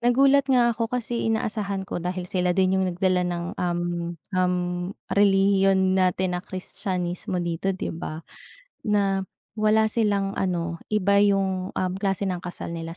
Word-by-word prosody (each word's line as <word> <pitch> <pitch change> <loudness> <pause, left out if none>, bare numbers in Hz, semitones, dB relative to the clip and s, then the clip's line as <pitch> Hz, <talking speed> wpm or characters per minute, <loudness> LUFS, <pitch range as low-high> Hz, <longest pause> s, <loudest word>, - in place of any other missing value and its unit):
Nagulat 275 +3 +4
nga 245 -2 +4
ako 230 0 -2
kasi 235 -1 -2
inaasahan 210 -3 -1
ko 175 - -4
dahil 180 +1 -3
sila 180 0 0
din 185 -1 +3
'yong 190 -1 +2
nagdala 185 0 +2
ng, 175 -1 -2 0.2
um 175 -1 0 0.5
um, 180 0 +2 0.6
relihiyon 195 -1 +4
natin 185 -1 +1
na 180 - -2
Kristiyanismo 185 -1 -4
dito, 175 +1 -2
'di 190 -1 -2
ba? 160 -1 -6 0.6
Na 200 -2 +2 0.3
wala 215 +1 +3
silang 205 -3 +1
ano, 170 -3 -2
iba 200 -1 +3
'yong, 195 -2 +1
um, 185 -1 0
klase 195 0 0
ng 180 -2 -2
kasal 175 -1 -6
nila, 165 0 -6
190 Hz, 150 wpm, -25 LUFS, 180-205 Hz, 0.6 s, Nagulat